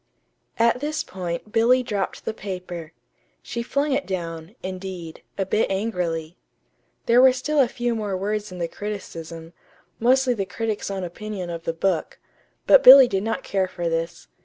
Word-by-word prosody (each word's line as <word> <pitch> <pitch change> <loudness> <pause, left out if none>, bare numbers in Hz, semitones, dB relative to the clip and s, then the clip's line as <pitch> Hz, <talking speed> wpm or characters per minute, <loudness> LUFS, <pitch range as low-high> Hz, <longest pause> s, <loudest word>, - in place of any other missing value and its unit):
At 235 +2 +3
this 300 +3 -2
point 180 +2 -6
Billy 240 +3 +4
dropped 205 -5 -3
the - - -2
paper. 180 -5 -7 0.5
She 235 - -4
flung 280 +5 -1
it 275 +1 0
down, 170 0 -5
indeed, 185 -3 -7 0.2
a 195 - 0
bit 210 +3 +1
angrily. 180 -5 -2 0.7
There 235 +2 +5
were 260 0 +8
still 285 +4 -1
a 265 - +5
few 240 0 -2
more 210 -4 -2
words 210 +1 -3
in 180 - -8
the 170 -1 -2
criticism, 165 -5 -7 0.5
mostly 255 +2 +3
the 200 -4 -2
critic's 215 +2 -3
own 195 -1 -3
opinion 185 0 -6
of 170 0 -7
the - - 0
book; 170 -1 -1 0.5
but - - +7
Billy 265 0 +11
did 195 -4 -1
not 225 +2 -2
care 190 -1 0
for 175 -2 -3
this. 165 - -3
195 Hz, 165 wpm, -23 LUFS, 175-235 Hz, 0.7 s, Billy